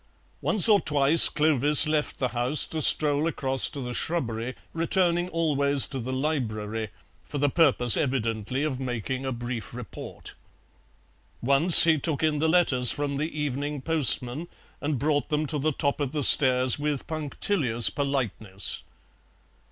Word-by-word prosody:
Once 215 -3 +4
or 210 -3 +3
twice 145 +2 +7
Clovis 150 -1 +4
left 155 -1 -3
the 130 - -3
house 125 +5 -1
to 160 - -6
stroll 150 +1 +2
across 135 -4 -1
to 145 - -9
the 125 -1 -7
shrubbery, 120 -6 -4 0.2
returning 175 +1 -1
always 145 -5 +1
to 135 - -8
the 125 +2 -6
library, 115 -6 -4 0.3
for 145 - -9
the 145 0 -1
purpose 130 -7 +3
evidently 125 -1 -3
of 140 -4 -4
making 130 +1 -6
a - - -3
brief 120 -1 -8
report. 125 -3 -11 1.1
Once 140 +7 +6
he 160 -2 +1
took 155 0 -4
in 155 -2 -1
the 160 +1 -1
letters 140 -8 +2
from 145 -1 -4
the 155 +3 -4
evening 145 +1 -5
postman, 150 0 -1 0.3
and 145 -1 -3
brought 145 +3 -2
them 150 0 -2
to 150 0 -4
the 155 +3 -1
top 140 +1 -2
of 140 -1 -4
the 150 -2 -2
stairs 130 -1 +4
with 145 -2 -4
punctilious 150 - -1
politeness. 110 -9 -2
140 Hz, 150 wpm, -24 LUFS, 125-155 Hz, 1.1 s, twice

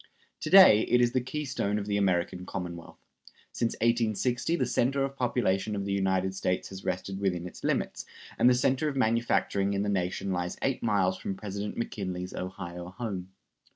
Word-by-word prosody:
To - - -4
day 190 - +9
it 125 - +4
is 120 -1 +3
the 130 - +1
keystone 130 -6 -2
of 105 - -3
the 100 -1 -1
American 90 -2 0
Commonwealth. 85 -2 -6 0.5
Since 115 - -1
1860 115 - +1
the 130 - +1
center 135 +3 +1
of 135 0 -3
population 110 -5 0
of 100 -1 -3
the 100 - -1
United 95 -1 +1
States 90 -1 -2
has 95 0 -9
rested 95 +1 -3
within 90 -3 -1
its 90 - -10
limits, - - -1 0.3
and 125 - +6
the 125 - +4
center 130 +4 +1
of 140 - -5
manufacturing 115 -5 +1
in 100 - 0
the 105 - -1
nation 95 0 -1
lies 90 -1 -2
eight 135 -1 0
miles 95 -4 +1
from 95 - -4
President 100 +1 -5
McKinley's 90 -5 -4
Ohio 90 -1 -6
home. 95 -3 -5
100 Hz, 180 wpm, -29 LUFS, 95-120 Hz, 0.5 s, day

